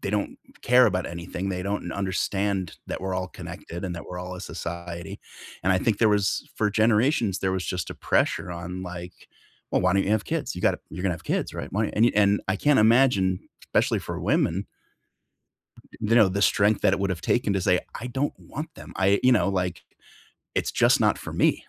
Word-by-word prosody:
they 100 Hz, -, -3 dB
don't 105 Hz, -1 st, -2 dB, 0.3 s
care 125 Hz, +1 st, +6 dB
about 90 Hz, -4 st, 0 dB
anything, 85 Hz, +3 st, -5 dB
they 90 Hz, -1 st, -2 dB
don't 100 Hz, -3 st, -3 dB
understand 95 Hz, -1 st, -1 dB
that -, -, -4 dB
we're 95 Hz, -1 st, -2 dB
all 90 Hz, 0 st, -2 dB
connected 85 Hz, 0 st, -8 dB
and 90 Hz, -2 st, -3 dB
that 85 Hz, -, -7 dB
we're 90 Hz, -, -7 dB
all 90 Hz, 0 st, -6 dB
a 90 Hz, -, -8 dB
society, 85 Hz, -1 st, -6 dB, 0.4 s
and 95 Hz, +2 st, +3 dB
I 95 Hz, -, +3 dB
think 105 Hz, +1 st, 0 dB
there 110 Hz, -, +4 dB
was 105 Hz, -1 st, +1 dB
for 105 Hz, -1 st, +1 dB
generations, 110 Hz, -, +2 dB
there 95 Hz, -1 st, 0 dB
was 95 Hz, -1 st, -2 dB
just 90 Hz, -1 st, -3 dB
a -, -, -5 dB
pressure 90 Hz, -, 0 dB
on, 90 Hz, +2 st, -6 dB
like, 90 Hz, 0 st, -7 dB, 0.6 s
"Well, -, -, +2 dB
why 90 Hz, 0 st, +3 dB
don't 100 Hz, 0 st, +3 dB
you 100 Hz, -, -1 dB
have 110 Hz, -1 st, +2 dB
kids? 160 Hz, -2 st, -2 dB
You -, -, -5 dB
gotta -, -, +2 dB
you're 90 Hz, +3 st, -6 dB
gonna 90 Hz, -3 st, +1 dB
have 80 Hz, -, -11 dB
kids, -, -, -1 dB
right? -, -, -6 dB
Why" 105 Hz, +2 st, 0 dB
And 115 Hz, +3 st, +5 dB
e -, -, +2 dB
and 100 Hz, 0 st, +4 dB
I 95 Hz, -, +1 dB
can't 145 Hz, +1 st, +3 dB
imagine 110 Hz, -6 st, +3 dB, 0.2 s
especially -, -, +1 dB
for -, -, -5 dB
women 95 Hz, +5 st, +1 dB, 1.1 s
th -, -, -18 dB
you -, -, +6 dB
know, 110 Hz, -5 st, +6 dB
the 100 Hz, +2 st, -2 dB
strength 100 Hz, +2 st, +3 dB
that 95 Hz, -, +4 dB
it 95 Hz, -, -1 dB
would've 95 Hz, -3 st, -1 dB
taken 110 Hz, -5 st, +1 dB
to 95 Hz, -, 0 dB
say, 90 Hz, 0 st, +3 dB, 0.2 s
"I 125 Hz, -, -5 dB
don't 135 Hz, +4 st, -1 dB
want 155 Hz, +3 st, -7 dB
them, -, -, -11 dB
I 95 Hz, +1 st, +3 dB
you 130 Hz, -, +6 dB
know, 105 Hz, -4 st, +3 dB
like, 90 Hz, -2 st, -2 dB, 0.7 s
it's -, -, 0 dB
just -, -, +4 dB
not -, -, +3 dB
for -, -, -7 dB
me," -, -, +2 dB
95 Hz, 220 wpm, -25 LUFS, 90-105 Hz, 1.1 s, care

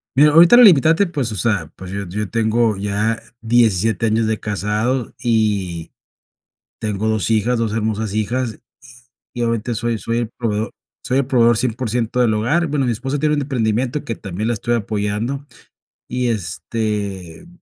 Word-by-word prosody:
Mira, 150 Hz, +2 st, +6 dB
ahorita 170 Hz, +9 st, +7 dB
la 245 Hz, -, +9 dB
limitante, 165 Hz, -, +6 dB
pues, 140 Hz, -9 st, -2 dB
o -, -, -4 dB
sea, 95 Hz, -5 st, -1 dB
pues, 95 Hz, 0 st, -9 dB
yo 100 Hz, -1 st, -4 dB
yo 105 Hz, +3 st, -4 dB
tengo 115 Hz, -1 st, +1 dB
ya 105 Hz, +3 st, -1 dB, 0.2 s
17 115 Hz, -2 st, +2 dB
años 110 Hz, +1 st, +1 dB
de 110 Hz, 0 st, -1 dB
casado 105 Hz, +4 st, -2 dB
y 105 Hz, -8 st, 0 dB, 0.9 s
tengo 105 Hz, 0 st, -2 dB
2 110 Hz, 0 st, 0 dB
hijas, 115 Hz, +2 st, +1 dB
2 110 Hz, -2 st, -1 dB
hermosas 110 Hz, -1 st, -2 dB
hijas, 115 Hz, +2 st, -2 dB, 0.7 s
y 120 Hz, -, -4 dB
obviamente 115 Hz, 0 st, -1 dB
soy 115 Hz, 0 st, -1 dB
soy 115 Hz, +1 st, -2 dB
el 115 Hz, -2 st, -2 dB
proveedor 110 Hz, -1 st, -2 dB, 0.3 s
soy 130 Hz, +1 st, +1 dB
el 140 Hz, -, 0 dB
proveedor 120 Hz, -3 st, +4 dB
100% 120 Hz, 0 st, -1 dB
del 115 Hz, -3 st, +3 dB
hogar, 140 Hz, +11 st, +1 dB
bueno 140 Hz, -2 st, 0 dB
mi -, -, +1 dB
esposa 135 Hz, +6 st, -3 dB
tiene 150 Hz, +1 st, +2 dB
un 145 Hz, -, -1 dB
emprendimiento 125 Hz, +1 st, -1 dB
que 115 Hz, -, -3 dB
también 100 Hz, +3 st, -4 dB
la -, -, +1 dB
estoy 120 Hz, +3 st, -2 dB
apoyando. 110 Hz, +5 st, -2 dB, 0.6 s
Y, 125 Hz, 0 st, -1 dB
este, 100 Hz, -, -3 dB
115 Hz, 165 wpm, -19 LUFS, 105-125 Hz, 0.9 s, la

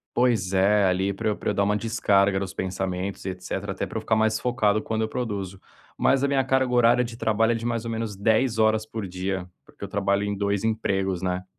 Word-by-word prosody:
Pois 115 Hz, -7 st, +2 dB
é, 100 Hz, +1 st, +4 dB
ali, 95 Hz, +2 st, +1 dB
para 110 Hz, +3 st, -3 dB
eu 105 Hz, -, +1 dB
para -, -, -3 dB
eu -, -, +1 dB
dar 100 Hz, -, +1 dB
uma 105 Hz, +1 st, +1 dB
descarga 100 Hz, -3 st, +2 dB
nos 95 Hz, -1 st, -5 dB
pensamentos 95 Hz, +1 st, -3 dB
e 95 Hz, -, -1 dB
etcétera. 90 Hz, 0 st, -5 dB
Até -, -, -3 dB
para -, -, -6 dB
eu -, -, -2 dB
ficar 110 Hz, -, +1 dB
mais 110 Hz, 0 st, +2 dB
focado 110 Hz, -4 st, +1 dB
quando 110 Hz, 0 st, -2 dB
eu 110 Hz, -, -1 dB
produzo. 100 Hz, -6 st, -4 dB, 0.4 s
Mas 135 Hz, 0 st, +2 dB
a -, -, +3 dB
minha 135 Hz, -1 st, +2 dB
carga 130 Hz, -1 st, +1 dB
horária 120 Hz, +1 st, +4 dB
de 115 Hz, -1 st, -7 dB
trabalho 110 Hz, +1 st, +2 dB
é -, -, +1 dB
de 115 Hz, +1 st, -5 dB
mais 115 Hz, -1 st, -1 dB
ou 115 Hz, -, -4 dB
menos 110 Hz, -3 st, -3 dB
10 110 Hz, +4 st, +1 dB
horas 110 Hz, 0 st, +2 dB
por 110 Hz, -2 st, -5 dB
dia, 95 Hz, 0 st, -3 dB, 0.2 s
porque -, -, -14 dB
eu -, -, -5 dB
trabalho 100 Hz, 0 st, 0 dB
em 100 Hz, -, -1 dB
2 100 Hz, 0 st, -1 dB
empregos, 95 Hz, -5 st, -1 dB
né? 90 Hz, 0 st, -2 dB
105 Hz, 240 wpm, -25 LUFS, 95-115 Hz, 0.4 s, é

